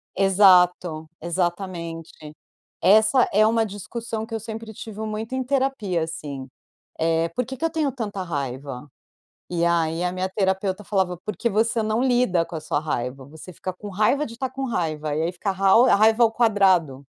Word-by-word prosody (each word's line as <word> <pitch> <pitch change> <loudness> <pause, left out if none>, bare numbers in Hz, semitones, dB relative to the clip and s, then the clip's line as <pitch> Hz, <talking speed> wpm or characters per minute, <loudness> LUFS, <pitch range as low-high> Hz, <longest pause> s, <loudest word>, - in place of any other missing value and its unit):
Exato. 180 -4 +4
Exatamente. 170 -3 -4 0.5
Essa 220 +6 +5
é 215 +2 +5
uma 225 0 +2
discussão 220 +2 -5
que 225 - -11
eu - - -2
sempre 220 0 -7
tive 215 0 -9
muito 220 +2 -4
em 260 - -1
terapia 260 - 0
assim, 145 -5 -6 0.5
eh: 165 0 +1
"Porque 250 +8 -4
que 325 - -5
eu 330 - +2
tenho 310 -3 0
tanta 205 -6 -4
raiva?" 140 -4 -5 0.6
E 170 -1 0
aí 165 -1 +1
a 180 - 0
minha 185 +1 -2
terapeuta 190 0 -1
falava: 190 -3 0
"Porque 210 +3 -2
você 225 +2 +1
não 220 +2 0
lida 245 -9 +2
com 165 0 -7
a - - -5
sua 155 - -1
raiva, 130 -3 -4
você 160 +5 -12
fica 185 +3 -5
com 205 +3 -10
raiva 215 +10 +1
de 230 - -9
estar 260 +2 -3
com 270 +1 -4
raiva, 155 - -2
e 155 - 0
aí 170 +2 -1
fica 190 +3 -3
a - - 0
rau 195 +6 +5
a - - +5
raiva 220 +3 +4
ao 225 - +2
quadrado." 190 - +2
190 Hz, 180 wpm, -23 LUFS, 165-225 Hz, 0.6 s, Essa